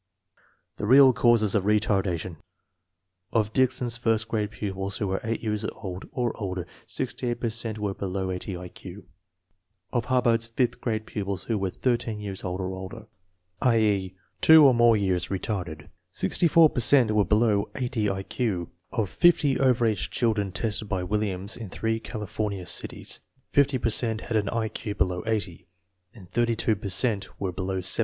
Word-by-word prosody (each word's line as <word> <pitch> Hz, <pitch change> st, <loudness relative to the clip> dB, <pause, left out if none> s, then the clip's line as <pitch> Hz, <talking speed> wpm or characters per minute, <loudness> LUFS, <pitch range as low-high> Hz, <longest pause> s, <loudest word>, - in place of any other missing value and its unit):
The 105 Hz, -, -3 dB
real 130 Hz, +2 st, +7 dB
cause 120 Hz, -2 st, +4 dB
of 105 Hz, -, +2 dB
retardation. 95 Hz, -5 st, 0 dB, 0.9 s
Of 110 Hz, -2 st, 0 dB
Dickson's 125 Hz, -2 st, +1 dB
first 115 Hz, -2 st, 0 dB
grade 105 Hz, -2 st, -1 dB
pupils 100 Hz, -1 st, -4 dB
who 105 Hz, -, -2 dB
were 95 Hz, 0 st, -2 dB
eight 115 Hz, +1 st, -3 dB
years 105 Hz, -1 st, -2 dB
old 95 Hz, -4 st, -7 dB
or 120 Hz, -2 st, -1 dB
older, 95 Hz, -3 st, -3 dB, 0.2 s
68 120 Hz, -1 st, -3 dB
per 115 Hz, -2 st, -1 dB
cent 115 Hz, -1 st, -5 dB
were 105 Hz, -2 st, -2 dB
below 95 Hz, -1 st, -3 dB
80 90 Hz, 0 st, -5 dB
I 90 Hz, 0 st, -8 dB
Q. -, -, -11 dB, 0.9 s
Of 120 Hz, -2 st, 0 dB
Hubbard's 120 Hz, -3 st, +2 dB
fifth 120 Hz, +1 st, -1 dB
grade 110 Hz, -2 st, -2 dB
pupils 100 Hz, -3 st, -4 dB
who 115 Hz, -, -1 dB
were 95 Hz, -1 st, -1 dB
thirteen 120 Hz, 0 st, -1 dB
years 100 Hz, -2 st, -6 dB
old 90 Hz, +1 st, -3 dB
or 95 Hz, 0 st, -3 dB
older 95 Hz, +4 st, -8 dB, 0.6 s
(i.e., 105 Hz, -6 st, +2 dB, 0.3 s
two 160 Hz, -2 st, +8 dB
or 135 Hz, -, +7 dB
more 120 Hz, -1 st, +5 dB
years 95 Hz, -4 st, 0 dB
retarded) 90 Hz, -6 st, -4 dB, 0.3 s
64 165 Hz, -2 st, +4 dB
per -, -, -2 dB
cent 125 Hz, -3 st, +5 dB
were 105 Hz, -1 st, +3 dB
below 105 Hz, +1 st, +2 dB
80 120 Hz, -5 st, -1 dB
I 95 Hz, 0 st, -3 dB
Q. 95 Hz, -8 st, -2 dB, 0.2 s
Of 110 Hz, -4 st, -1 dB
50 155 Hz, -, +3 dB
over 125 Hz, -3 st, +3 dB
age 110 Hz, -4 st, 0 dB
children 110 Hz, -5 st, 0 dB
tested 105 Hz, +1 st, -2 dB
by 95 Hz, -2 st, -1 dB
Williams 100 Hz, 0 st, -2 dB
in 110 Hz, -5 st, -8 dB
three 110 Hz, +4 st, -2 dB
California 105 Hz, -4 st, -4 dB
cities, -, -, -2 dB, 0.3 s
50 140 Hz, -1 st, +3 dB
per 115 Hz, -, 0 dB
cent 110 Hz, 0 st, 0 dB
had 120 Hz, -, -4 dB
an 105 Hz, -2 st, +1 dB
I 115 Hz, -1 st, -1 dB
Q 105 Hz, -1 st, -5 dB
below 90 Hz, +1 st, 0 dB
80, 100 Hz, -6 st, -3 dB, 0.5 s
and 95 Hz, -6 st, -13 dB
38 115 Hz, 0 st, 0 dB
per 100 Hz, -, -4 dB
cent 100 Hz, +1 st, +1 dB
were 95 Hz, -2 st, -2 dB
below 95 Hz, +1 st, -3 dB
75. 90 Hz, -, +3 dB
105 Hz, 170 wpm, -26 LUFS, 95-115 Hz, 0.9 s, two